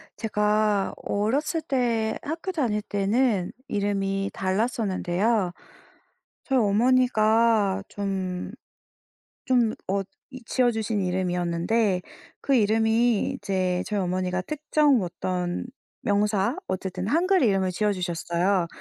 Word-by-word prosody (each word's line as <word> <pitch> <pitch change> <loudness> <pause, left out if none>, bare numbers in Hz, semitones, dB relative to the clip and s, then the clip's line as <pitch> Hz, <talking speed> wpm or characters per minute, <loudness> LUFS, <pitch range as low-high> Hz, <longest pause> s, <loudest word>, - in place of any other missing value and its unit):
제가 210 -2 +1
어렸을 275 - 0
때 235 -7 0
학교 325 +5 -4
다닐 240 - 0
때는 205 -1 0 0.2
이름이 195 -1 -1
달랐었는데요. 195 -1 0 0.9
저희 265 -1 +1
어머니가 220 -2 +3
좀 190 -3 -3 0.9
좀 240 -4 +3
어 195 +1 +1 0.3
이 255 -2 -10
지어 250 0 +2
주신 220 -2 -2
이름이었는데 180 +2 0 0.4
그 275 - +2
이름이 225 0 +2
이제 185 -2 -1
저희 210 -1 -1
어머니가 185 0 -1
특정 300 -1 +2
어떤 180 0 -3 0.4
명사, 205 +2 +1
어쨌든 185 0 -3
한글 365 - +3
이름을 195 -5 +2
지어 210 +3 +1
주셨어요. 175 +1 0
205 Hz, 235 characters per minute, -25 LUFS, 185-235 Hz, 0.9 s, 어머니가